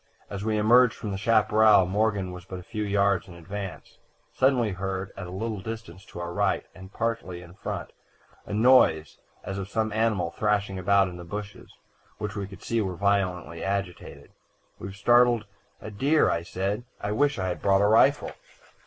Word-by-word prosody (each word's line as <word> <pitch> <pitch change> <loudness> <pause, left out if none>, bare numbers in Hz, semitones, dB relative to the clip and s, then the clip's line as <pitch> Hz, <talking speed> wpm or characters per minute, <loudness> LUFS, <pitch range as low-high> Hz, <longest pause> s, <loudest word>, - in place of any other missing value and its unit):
As 100 0 -5
we 110 0 0
emerged 120 +3 +5
from 105 - -5
the 95 - -3
chaparral, 110 -2 +4
Morgan 100 -1 0
was 90 0 -9
but 95 0 -8
a 90 - -9
few 105 +4 -5
yards 100 -1 +1
in 90 - -12
advance. 95 +3 -8 0.3
Suddenly, 130 -4 +2
we - - -4
heard, 95 +1 -4
at 95 -2 -7
a - - -9
little 110 +2 -4
distance 95 -3 -8
to - - -10
our 85 0 -5
right, - - 0
and 95 +1 -12
partly 115 -7 -3
in 85 0 -14
front, - - -6 0.6
a - - -7
noise 105 - +4 0.2
as 95 0 -5
of 95 0 -6
some 110 0 -1
animal 110 -6 0
thrashing 105 -2 -1
about 100 +1 +3
in 90 -1 -8
the 90 - -8
bushes, 100 +3 -8 0.5
which 105 0 -5
we 100 -2 -4
could 100 -2 -13
see 115 -1 0
were 95 -3 -3
violently 90 -3 -1
agitated. 100 -3 -4 0.5
"'We've 95 0 -7
started 120 +1 +4 0.3
a 110 - -8
deer,' 130 - +2
said. 100 +6 -2 0.2
'I 105 - -2
wish 140 +5 +1
we 95 - -2
had 90 -1 -3
brought 100 0 +3
a - - +4
rifle.' 135 +7 +4
100 Hz, 185 wpm, -26 LUFS, 95-110 Hz, 0.6 s, emerged